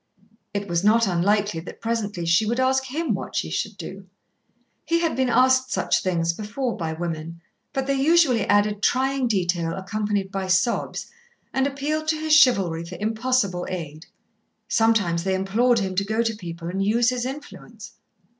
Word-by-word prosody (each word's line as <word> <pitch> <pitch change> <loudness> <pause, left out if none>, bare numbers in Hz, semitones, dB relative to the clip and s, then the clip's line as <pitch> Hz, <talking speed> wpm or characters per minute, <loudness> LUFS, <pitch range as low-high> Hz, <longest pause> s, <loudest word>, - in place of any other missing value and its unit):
It 200 0 -3
was 170 0 0
not 225 +2 +4
unlikely 200 0 +1
that 160 - -10
presently 210 -6 -2
she 170 +6 +3
would 235 +3 0
ask 265 +1 +2
him 310 +6 -2
what - - -5
she - - -1
should - - -3
do. - - -9 0.8
He 335 0 +1
had 330 -2 0
been 260 -1 +1
asked 260 +1 +3
such - - +1
things 170 -3 0
before 230 +6 -3
by 165 -5 -3
women, 165 0 -5 0.3
but 270 -1 -2
they 275 - 0
usually 290 -7 +4
added 205 0 +2
trying 265 +2 +1
detail 175 -5 0
accompanied 200 0 -2
by 195 -1 -3
sobs, 185 +6 0 0.5
and 265 +1 +2
appealed 295 +3 -3
to 315 - +2
his 315 0 +1
chivalry 195 - +4
for 170 +2 -8
impossible 220 -4 0
aid. 160 -3 -6 0.6
Sometimes 205 -7 +2
they 190 0 0
implored 225 +6 +2
him 190 -3 -1
to 190 +2 +1
go 220 +3 0
to 225 -1 -1
people 170 -4 -7
and 190 +3 -2
use 230 +4 +3
his 250 -1 -2
influence. 235 -6 -9
210 Hz, 170 wpm, -23 LUFS, 185-255 Hz, 0.8 s, not